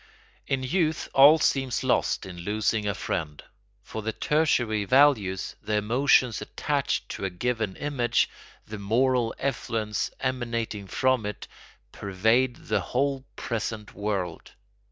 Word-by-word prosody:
In 135 -1 -1
youth 160 +3 0
all 145 +4 +8
seems 135 -4 0
lost - - +1
in 90 -2 -9
losing 105 +3 0
a 100 - 0
friend. 75 -2 -4 0.4
For 110 - -6
the 110 +1 -2
tertiary 120 -4 +1
values, 105 -6 +3
the 105 - -2
emotions 120 +2 +3
attached - - -2
to - - -6
a - - 0
given 110 +1 -2
image, 125 -5 +1 0.4
the 105 0 -7
moral 120 +3 +1
effluence 115 -5 -2
emanating 115 -5 -2
from 130 +3 +1
it, 105 - -6 0.4
pervade 110 +6 +1
the 105 -1 +1
whole 135 +6 -1
present 110 -2 -4
world. 100 -5 -3
115 Hz, 125 wpm, -26 LUFS, 105-130 Hz, 0.4 s, all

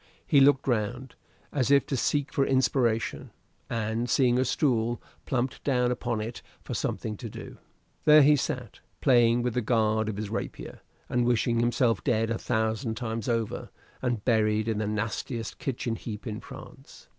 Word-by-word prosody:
He 145 -5 +4
looked 140 0 +4
round, 120 +2 -1 0.4
as 135 -3 0
if 140 0 +5
to 140 - -2
seek 145 +3 0
for 140 - +2
inspiration, 130 -4 +1 0.4
and 115 +1 -2
seeing 125 -1 +3
a 130 - +2
stool, 120 -4 +1 0.3
plumped 130 -1 -2
down 125 -3 +2
upon 120 -2 -2
it 115 +2 -6 0.2
for - - -5
something 110 -1 -2
to 115 - -7
do. - - -10 0.5
There 150 -1 +8
he 150 +2 +6
sat, 125 -4 -4 0.2
playing 120 -3 +4
with 125 -2 -1
the 125 - 0
guard 110 -1 +1
of 105 - -4
his 105 -1 -4
rapier, - - -5 0.3
and 125 0 +1
wishing 120 -1 +2
himself 120 -2 +1
dead 115 -3 +1
a 115 - -1
thousand 110 +1 -1
times 115 -2 -3
over, 115 -2 -2 0.3
and 120 -5 -2
buried 110 -2 +2
in 110 -2 0
the 110 - -1
nastiest 110 +2 -3
kitchen 120 -3 -2
heap 110 0 -7
in 110 -3 -4
France. - - -13
120 Hz, 170 wpm, -27 LUFS, 110-130 Hz, 0.5 s, There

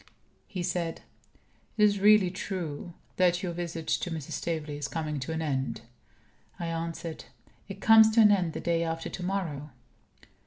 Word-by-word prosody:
He 185 -4 -4
said: 175 -2 -2 0.7
"Is 210 -1 +4
it - - -7
really 205 -3 +6
true 175 -4 -5 0.2
that 180 0 +3
your 180 - -1
visit 170 -2 -5
to - - 0
Mrs. 160 -4 -6
Staveley 155 -3 -3
is 145 -1 -3
coming 155 -2 -3
to 135 +4 -4
an 160 0 -2
end?" 135 -5 -2 0.8
I 170 - -3
answered: 165 0 -4 0.4
"It 195 -1 -9
comes 220 -1 +8
to 230 - +7
an 210 -1 +7
end 180 -5 +1
the - - -5
day 170 -1 +1
after 165 0 -3
to 180 - -6
morrow." 170 -6 -3
170 Hz, 165 wpm, -28 LUFS, 160-185 Hz, 0.8 s, comes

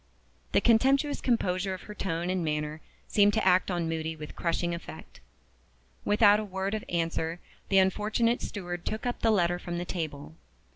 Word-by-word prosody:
The - - +4
contemptuous 270 +5 +3
composure 190 -5 0
of 185 - -11
her 210 - -9
tone 175 -3 -2
and 185 -2 -1
manner 150 0 -2 0.3
seemed 205 0 +4
to 220 -3 +1
act 185 +1 +4
on 175 -3 -1
Moody 160 0 -3
with 150 -1 -9
crushing 170 0 -1
effect. 170 - -9 0.9
Without 205 0 +5
a - - -2
word 190 0 -3
of 215 - -2
answer, 165 0 -1 0.3
the 195 - +3
unfortunate 215 +5 +2
steward 175 -4 -5
took 220 +2 -4
up 245 - -2
the 225 - +2
letter 175 -4 +2
from 175 -1 -5
the 175 - -3
table. 155 -4 -5
185 Hz, 175 wpm, -28 LUFS, 170-210 Hz, 0.9 s, Without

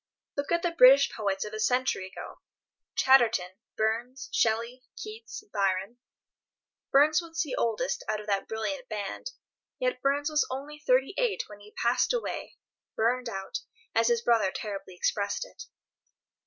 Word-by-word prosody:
Look 285 +2 -3
at 340 0 +2
the 345 - +1
British 280 -3 +7
poets 195 -3 -2
of 210 - -7
a 215 - -4
century 250 -4 +1
ago: 190 - -9 0.6
Chatterton, 235 -9 +4 0.3
Burns, 235 +4 -1
Shelley, 235 +3 +1
Keats, 430 0 -8
Byron. 195 +4 0 0.9
Burns 305 +4 +5
was 330 -1 -2
the 290 - -4
oldest 250 +5 -1
of 215 -1 -2
that 200 -2 -1
brilliant 255 +5 -3
band, 210 - -4 0.5
yet - - -1
Burns 285 +1 +1
was 300 0 +2
only 285 +3 -6
thirty 265 +2 +2
eight 485 -4 +1
when 210 -1 -12
he 205 +1 -15
passed 240 - +2
away, 485 - -4 0.4
"burned 245 +2 +1
out," 195 -3 -4 0.3
as 230 0 +3
his 235 -1 +2
brother 225 -5 +3
terribly 195 -4 -6
expressed 200 - -1
it. - - -12
245 Hz, 145 wpm, -28 LUFS, 215-285 Hz, 0.9 s, British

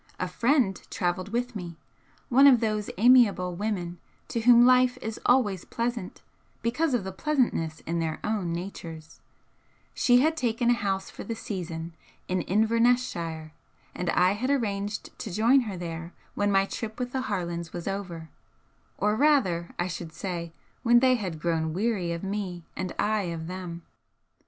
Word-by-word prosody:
A 185 - -1
friend 235 +1 +1
travelled 180 +2 -2
with 245 +2 -2
me 175 -4 -6 0.5
one 270 +2 +6
of 255 -4 +7
those 215 -2 -1
amiable 215 -6 +5
women 180 -3 -3 0.3
to 230 - -1
whom 240 +1 +7
life 255 0 +5
is 220 0 -5
always 210 -8 +3
pleasant 235 -5 -4 0.4
because 255 +5 +1
of 230 - -1
the 190 - -5
pleasantness 190 - 0
in 170 +1 -2
their 160 -1 -2
own 210 -5 -1
natures; 165 -3 -7 0.7
she 245 0 +4
had 315 +3 +2
taken 240 -3 +1
a - - +6
house 195 -4 -2
for - - -8
the 230 - -4
season 170 -6 -5 0.3
in 185 0 0
Inverness 230 +6 +3
shire, 160 -2 -6 0.4
and 180 -1 -3
I 180 +2 +4
had 225 +6 -2
arranged 205 -6 -2
to - - -5
join 230 +8 +4
her 190 - -5
there 170 0 -6 0.2
when 205 0 +1
my 195 0 +4
trip 220 +2 -6
with 250 -1 -3
the 265 - -1
Harlands 170 -4 -3
was 175 +1 -6
over, 180 -5 -5 0.7
or 210 +2 +1
rather, 220 - +2
I 175 - 0
should 170 -2 -6
say, 170 -3 -4 0.3
when 240 -1 +5
they 255 0 +4
had 185 -10 -3
grown 160 -1 -1
weary 195 -4 0
of 170 +1 -4
me 195 -3 -4
and 185 -2 -3
I 210 -1 +1
of 165 -1 -5
them. 175 -1 -6
200 Hz, 165 wpm, -27 LUFS, 175-235 Hz, 0.7 s, of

